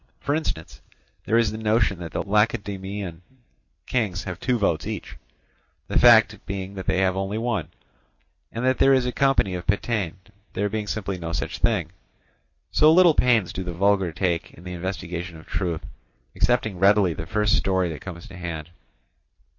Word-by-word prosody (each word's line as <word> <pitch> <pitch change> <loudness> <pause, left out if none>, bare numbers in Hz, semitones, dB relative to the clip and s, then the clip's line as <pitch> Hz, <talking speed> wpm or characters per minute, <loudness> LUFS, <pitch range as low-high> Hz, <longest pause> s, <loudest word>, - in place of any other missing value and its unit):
For 140 - -1
instance, 145 - -3 0.4
there 115 - +2
is 115 -3 +3
the 110 - -6
notion 110 -4 +1
that 85 -2 -7
the - - -2
Lacedaemonian 100 -3 -1 0.6
kings 100 -8 -1
have 90 -3 -6
two 125 -2 +1
votes 100 -7 0
each, - - -6 0.7
the - - +2
fact 110 -3 +6
being 95 0 -4
that 95 -2 -7
they - - +2
have 95 -1 +2
only 95 +2 -2
one; 115 -8 -1 0.8
and 115 +2 -3
that 130 0 +2
there 135 0 +6
is 130 -2 +1
a 125 - 0
company 135 -8 +2
of 90 -1 -5
Pitane, 100 -3 0 0.4
there 105 +1 -1
being 105 0 -3
simply 100 -3 -3
no 85 0 -5
such 85 0 -3
thing. 95 -9 +1 0.8
So 155 +1 +5
little 175 0 +6
pains 120 -9 +2
do 95 - -4
the 90 -1 -5
vulgar 95 0 +2
take 85 0 -2
in 85 - -15
the 90 0 -6
investigation 90 -1 -5
of 80 - -14
truth, 85 -4 -2 0.5
accepting 110 -6 +1
readily 100 -2 +4
the 80 +1 -7
first 105 -1 +2
story 95 -2 +1
that 80 - -7
comes 85 -3 -8
to 95 - -11
hand. 85 -2 -6
100 Hz, 175 wpm, -24 LUFS, 90-110 Hz, 0.8 s, fact